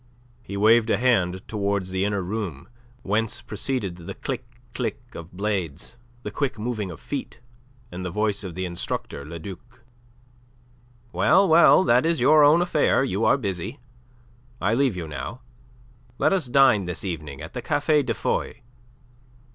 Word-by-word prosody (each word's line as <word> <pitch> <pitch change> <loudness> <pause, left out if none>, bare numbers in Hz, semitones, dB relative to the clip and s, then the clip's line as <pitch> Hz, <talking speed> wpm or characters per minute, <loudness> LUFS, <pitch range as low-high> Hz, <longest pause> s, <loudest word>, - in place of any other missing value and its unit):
He 100 -4 -7
waved 110 +2 +4
a - - +3
hand 95 -7 +1
towards 100 -3 -2
the 95 0 0
inner 100 -2 -1
room, 90 -7 -5 0.4
whence 110 +3 -1
proceeded 105 -4 -3
the 90 +3 -8
click 130 -2 -4 0.3
click 115 -5 -3
of 85 +1 -9
blades, 95 -2 -3 0.3
the - - -5
quick 140 -5 -2
moving 110 -3 -3
of 80 - -9
feet, - - -6 0.5
and 90 +1 -6
the 90 - -3
voice 105 +2 -1
of 90 -4 -7
the 95 0 -3
instructor, 85 -4 -4
Le 80 +4 -8
Duc. 110 +8 -11 1.3
"Well, 195 +1 +4
well, 170 +3 +7
that 125 -6 +4
is 165 0 +1
your 155 0 +6
own 155 +4 +6
affair. 150 -6 +2
You 110 -4 -1
are - - +4
busy. 100 - -4 0.8
I 105 +4 +1
leave 130 -3 +2
you 85 -3 -5
now. 75 - -6 0.8
Let - - +2
us 180 -8 0
dine 125 -6 +4
this 90 +2 -4
evening 75 -6 -5
at - - -9
the - - -4
Café 150 -2 +2
de - - -2
Foy. - - -2
105 Hz, 160 wpm, -24 LUFS, 90-125 Hz, 1.3 s, well